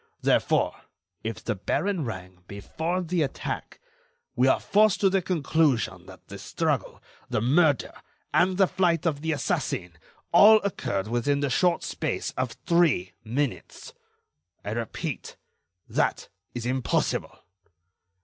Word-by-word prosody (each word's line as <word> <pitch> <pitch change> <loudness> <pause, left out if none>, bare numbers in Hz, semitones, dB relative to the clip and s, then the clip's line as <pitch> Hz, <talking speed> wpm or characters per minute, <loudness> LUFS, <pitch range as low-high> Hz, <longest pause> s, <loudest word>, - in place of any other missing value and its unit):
Therefore, - - +2 0.5
if - - -5
the - - -1
baron 195 -7 -1
rang 95 -4 -8
before 160 - -3
the 175 0 -1
attack, 140 - -4 0.6
we 125 +2 +3
are 130 - +4
forced 210 -1 +3
to 195 -2 +4
the 195 0 +2
conclusion 160 -7 0
that - - -14
the - - -9
struggle, - - -2 0.3
the - - 0
murder 145 +3 +2 0.4
and 180 +4 +3
the 195 - +6
flight 175 -3 +1
of 150 -4 0
the 160 +1 -1
assassin, 135 - -2 0.4
all 220 +2 +8
occurred 120 - -2
within 120 +5 0
the 140 -2 0
short 175 +6 +2
space - - -3
of 130 -2 -3
three 160 - +2
minutes. 125 +4 -4 0.7
I 100 - -3
repeat: 115 -1 -5 0.5
that - - -1 0.3
is 120 -1 -4
impossible." 130 0 -1
145 Hz, 130 wpm, -26 LUFS, 120-175 Hz, 0.7 s, all